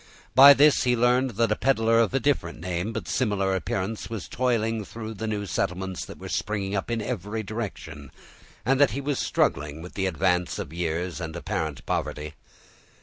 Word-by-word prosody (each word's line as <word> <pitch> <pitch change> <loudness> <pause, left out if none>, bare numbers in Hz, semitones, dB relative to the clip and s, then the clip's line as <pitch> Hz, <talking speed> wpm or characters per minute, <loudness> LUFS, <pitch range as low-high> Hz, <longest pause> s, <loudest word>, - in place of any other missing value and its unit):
By 140 +2 +10
this 150 +1 +5
he 125 -1 +2
learned 125 0 +2
that 115 0 +2
a - - +3
peddler 115 -4 +2
of 115 -3 +3
a 135 - +1
different 120 - 0
name, 90 +4 -3
but - - -5
similar 100 -6 0
appearance, 95 +3 -3
was 110 -6 -5
toiling 115 -3 0
through 110 +1 -7
the 110 +1 -5
new 105 -1 -2
settlements 95 +1 -2
that - - -10
were - - -8
springing 100 -2 -2
up 95 - -2
in 115 -2 -1
every 110 -1 -3
direction, 85 - -6 0.5
and 135 +3 +3
that 140 - +6
he - - -1
was 140 -1 -1
struggling 75 +3 0
with 90 - -10
the 95 -1 -1
advance 90 +1 0
of - - -6
years 85 +1 -2
and 80 0 -5
apparent 80 -3 -3
poverty. 75 0 -3
105 Hz, 185 wpm, -26 LUFS, 90-115 Hz, 0.5 s, By